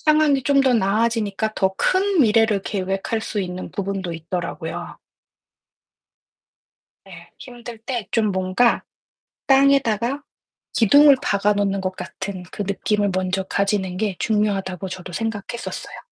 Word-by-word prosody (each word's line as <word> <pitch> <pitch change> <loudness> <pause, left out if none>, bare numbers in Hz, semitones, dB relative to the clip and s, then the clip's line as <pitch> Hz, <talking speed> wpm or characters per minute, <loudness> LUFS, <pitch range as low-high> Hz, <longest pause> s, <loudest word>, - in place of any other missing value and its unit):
상황이 305 -3 +3
좀 280 +2 +3
더 260 -2 +3
나아지니까 220 0 0
더 190 0 +1
큰 380 - +2
미래를 220 -4 +3
계획할 195 +3 -2
수 215 -1 -3
있는 180 0 -5
부분도 195 -3 -3
있더라고요. 170 0 -5 2.1
네. - - -13
힘들 240 -2 -10
때 235 -1 -4
좀 215 -3 +1
뭔가 190 +6 +2 0.6
땅에다가 270 -2 +3 0.5
기둥을 285 +6 +6
박아 205 +1 +2
놓는 200 -1 0
것 185 0 -3
같은 190 -1 -6
그 - - -3
느낌을 205 +1 0
먼저 185 +1 0
가지는 195 -1 -1
게 205 -1 -1
중요하다고 200 -4 -1
저도 185 -1 -7
생각했었어요. 225 +2 -5
205 Hz, 270 characters per minute, -22 LUFS, 190-235 Hz, 2.1 s, 기둥을